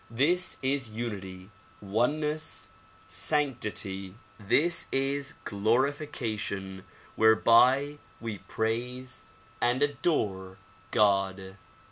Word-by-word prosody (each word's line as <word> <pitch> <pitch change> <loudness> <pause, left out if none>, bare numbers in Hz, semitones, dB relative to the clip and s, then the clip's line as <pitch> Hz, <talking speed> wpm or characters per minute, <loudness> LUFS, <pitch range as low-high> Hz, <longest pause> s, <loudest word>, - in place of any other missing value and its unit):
This 160 +11 +1
is 135 -2 +1
unity, 100 -4 -6 0.3
oneness, 150 +10 -1 0.4
sanctity; 100 - -1 0.2
this 155 +12 +2
is 140 +2 -1
glorification 110 -4 -1 0.3
whereby 125 +6 +5 0.2
we 110 -4 -5
praise 125 +4 -3 0.4
and 125 +3 +2
adore 100 - -1 0.3
God. 95 -2 +1
115 Hz, 70 wpm, -29 LUFS, 100-140 Hz, 0.4 s, whereby